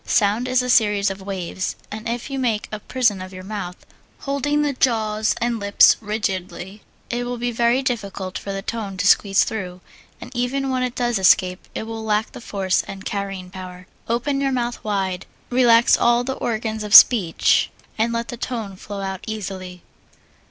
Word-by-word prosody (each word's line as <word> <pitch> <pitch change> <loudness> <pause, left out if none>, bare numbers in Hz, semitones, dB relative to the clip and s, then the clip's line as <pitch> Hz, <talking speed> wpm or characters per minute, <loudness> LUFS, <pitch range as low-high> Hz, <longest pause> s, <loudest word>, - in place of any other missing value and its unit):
Sound 215 +4 +1
is 255 0 +2
a - - -3
series 210 -3 +3
of 195 0 -8
waves, 190 -1 -4 0.2
and 220 +2 -5
if 240 +3 -4
you 270 - -2
make 230 -5 0
a 215 - -4
prison 220 -4 0
of 185 0 -8
your 185 0 -9
mouth, 190 -3 -5 0.5
holding 290 +2 0
the 290 -1 0
jaws 220 -4 +1
and 235 -1 -1
lips 200 0 +6
rigidly, 195 -2 -4 0.3
it 240 0 -1
will 245 0 -4
be 240 +1 -2
very 235 +3 +2
difficult 200 -7 -3
for 200 - -5
the 195 0 -4
tone 205 -4 -4
to 200 - -1
squeeze 200 -1 +4
through, 185 -4 -5 0.4
and 250 - -10
even 265 +3 -1
when 255 -1 0
it 250 -1 -2
does 240 -4 0
escape 185 0 +3
it - - -3
will 225 0 -6
lack 215 0 0
force 195 -4 0
and 195 -1 -8
carrying 195 -3 -4
power. 185 -1 -9 0.2
Open 275 +4 0
your 275 -1 +1
mouth 240 -2 -2
wide, 195 -3 -2 0.2
relax 240 -2 +5
all 240 0 +3
the 265 +2 -2
organs 220 -3 -3
of 210 0 +3
speech, 195 -10 +6 0.3
and 225 +2 0
let 230 0 -3
the 240 - -5
tone 225 -5 -4
flow 200 +1 -7
out 190 -1 -5
easily. 185 -4 -6
215 Hz, 180 wpm, -22 LUFS, 195-240 Hz, 0.5 s, lips